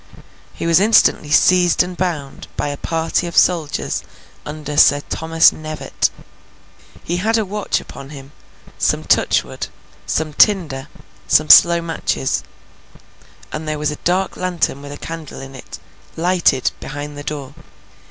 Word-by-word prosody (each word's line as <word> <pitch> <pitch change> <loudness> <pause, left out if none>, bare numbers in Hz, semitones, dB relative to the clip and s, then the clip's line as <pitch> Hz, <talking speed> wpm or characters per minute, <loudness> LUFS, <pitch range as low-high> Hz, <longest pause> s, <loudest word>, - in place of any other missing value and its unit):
He - - -6
was 170 +1 +4
instantly 205 -7 +3
seized 180 +3 +4
and 180 0 -7
bound, 165 -7 -4
by 145 - -1
a 145 - -5
party 165 +2 -1
of 170 - -6
soldiers 165 -5 +1 0.5
under 150 -1 -6
Sir 145 0 +5
Thomas 160 0 +4
Knevett. 155 -1 -3 0.9
He 175 - -2
had 220 +5 +1
a 220 - 0
watch 205 +1 -2
upon 135 - -11
him, 140 -1 -11 0.5
some - - +1
touchwood, - - +1 0.4
some 155 -1 -1
tinder, 150 -9 +2 0.4
some 155 0 +3
slow 170 -1 +7
matches; 165 -5 -2 1.1
and 155 +1 -5
there 155 0 -2
was 150 0 -1
a - - -4
dark 185 +2 -1
lantern 175 -6 -2
with 145 0 -9
a 145 - -7
candle 165 -3 -8
in 135 0 -10
it, 130 - -10 0.4
lighted, 170 -6 +2
behind 145 +1 -7
the 145 - -8
door. 140 -3 -6
160 Hz, 145 wpm, -18 LUFS, 145-175 Hz, 1.1 s, slow